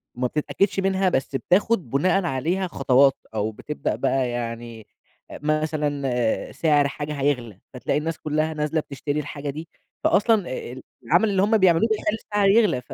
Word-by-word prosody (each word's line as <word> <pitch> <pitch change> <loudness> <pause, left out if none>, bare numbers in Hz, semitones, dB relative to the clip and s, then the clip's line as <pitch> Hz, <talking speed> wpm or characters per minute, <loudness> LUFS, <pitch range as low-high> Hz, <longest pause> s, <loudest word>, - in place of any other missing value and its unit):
ما 125 +1 0
بتتأكدش 195 +8 0
منها، 190 0 +2
بس 135 -4 -1
بتاخد 180 - +1
بُناءً 185 +8 +2
عليها 170 +7 -1
خطوات 135 -3 +4 0.2
أو 110 0 -1
بتبدأ 150 +7 -4
بقى 135 -2 0
يعني 115 -2 -6 0.4
مثلًا 145 -5 -1
سعر 150 -3 +2
حاجة 150 +1 -5
هيغلى، 120 -8 -1
فتلاقي 125 - -1
الناس 165 +1 -3
كلّها 155 +1 -1
نازلة 150 +1 -1
بتشتري 145 +1 -4
الحاجة 145 -1 -5
دي، 155 +4 -6 0.4
فأصلًا 220 +3 +4 0.7
العمل 175 - +3
اللي 195 -2 +2
هُم 215 +2 +3
بيعملوه 185 +1 +4
بيخلّي 220 0 0
السعر 205 -2 +2
يغلى، 205 - +3
ف - - -11
150 Hz, 150 wpm, -23 LUFS, 130-185 Hz, 0.7 s, خطوات